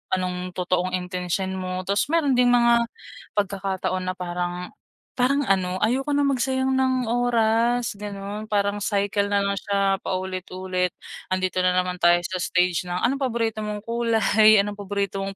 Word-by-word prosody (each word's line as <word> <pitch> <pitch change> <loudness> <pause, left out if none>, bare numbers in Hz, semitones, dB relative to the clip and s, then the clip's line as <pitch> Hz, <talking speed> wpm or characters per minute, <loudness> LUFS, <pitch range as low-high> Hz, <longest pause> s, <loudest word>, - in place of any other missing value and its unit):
anong 180 0 -4
totoong 180 0 -1
intensyon 180 +1 -3
mo, 185 0 -3
tapos 200 +5 +1
meron 325 -4 +2
ding 250 0 +5
mga 235 -1 +4 0.5
pagkakataon 195 -2 -1
na 185 - -2
parang 180 0 -4 0.5
parang 275 +3 +2
ano 185 -3 +1
ayoko 265 +6 +1
na 285 - +2
magsayang 260 0 0
ng 260 -2 +1
oras 235 -1 +1
ganun. 205 +1 -6
Parang 205 0 +1
cycle 200 0 0
na 200 0 +2
lang 200 0 -1
siya 195 -1 0
paulit-ulit 185 -1 -2 0.4
'andito 185 0 0
na 180 0 +2
naman 180 0 0
tayo 175 0 +5
sa 185 +1 -3
stage 180 0 +1
na 180 +1 -3
anong 270 +4 +1
paborito 230 -3 -1
mong 210 -1 -5
kulay, 225 -2 +4
anong 205 0 -5
paborito 200 -1 -2
mong 195 0 -5
200 Hz, 150 wpm, -24 LUFS, 185-230 Hz, 0.5 s, ding